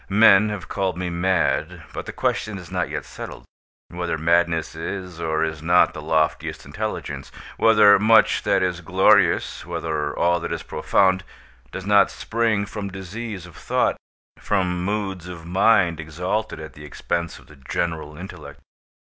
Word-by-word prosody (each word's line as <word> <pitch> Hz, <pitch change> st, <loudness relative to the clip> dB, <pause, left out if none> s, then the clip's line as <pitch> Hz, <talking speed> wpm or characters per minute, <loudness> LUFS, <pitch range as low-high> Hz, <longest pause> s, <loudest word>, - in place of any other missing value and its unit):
Men 105 Hz, 0 st, +6 dB
have 100 Hz, -4 st, -5 dB
called 95 Hz, -2 st, -2 dB
me 90 Hz, -1 st, -3 dB
mad; 85 Hz, 0 st, 0 dB
but -, -, -6 dB
the -, -, -4 dB
question 110 Hz, -2 st, -2 dB
is 90 Hz, -4 st, -11 dB
not -, -, -1 dB
yet -, -, -4 dB
settled, -, -, -9 dB, 0.5 s
whether 85 Hz, -1 st, -3 dB
madness 85 Hz, 0 st, +1 dB
is 90 Hz, +1 st, -6 dB
or 80 Hz, -1 st, 0 dB
is 80 Hz, -1 st, -3 dB
not 90 Hz, +2 st, +4 dB
the 75 Hz, -, -7 dB
loftiest 80 Hz, 0 st, -1 dB
intelligence—whether 105 Hz, -3 st, +2 dB
much 110 Hz, +2 st, +5 dB
that -, -, +2 dB
is -, -, -1 dB
glorious—whether 80 Hz, -3 st, +1 dB
all 85 Hz, 0 st, +2 dB
that -, -, -5 dB
is -, -, -3 dB
profound—does 95 Hz, -6 st, -1 dB
not 100 Hz, -1 st, +5 dB
spring 110 Hz, -3 st, -1 dB
from 100 Hz, -1 st, -5 dB
disease 95 Hz, +1 st, -7 dB
of 85 Hz, -3 st, -14 dB
thought—from 90 Hz, -3 st, -2 dB
moods 95 Hz, -3 st, -3 dB
of 85 Hz, -2 st, -9 dB
mind 90 Hz, -2 st, +3 dB
exalted 90 Hz, +8 st, -3 dB
at 80 Hz, 0 st, -9 dB
the 75 Hz, -, -12 dB
expense 85 Hz, +3 st, -3 dB
of -, -, -17 dB
the 75 Hz, -, -16 dB
general 75 Hz, +2 st, -3 dB
intellect. 95 Hz, +3 st, -10 dB
90 Hz, 145 wpm, -23 LUFS, 80-100 Hz, 0.5 s, Men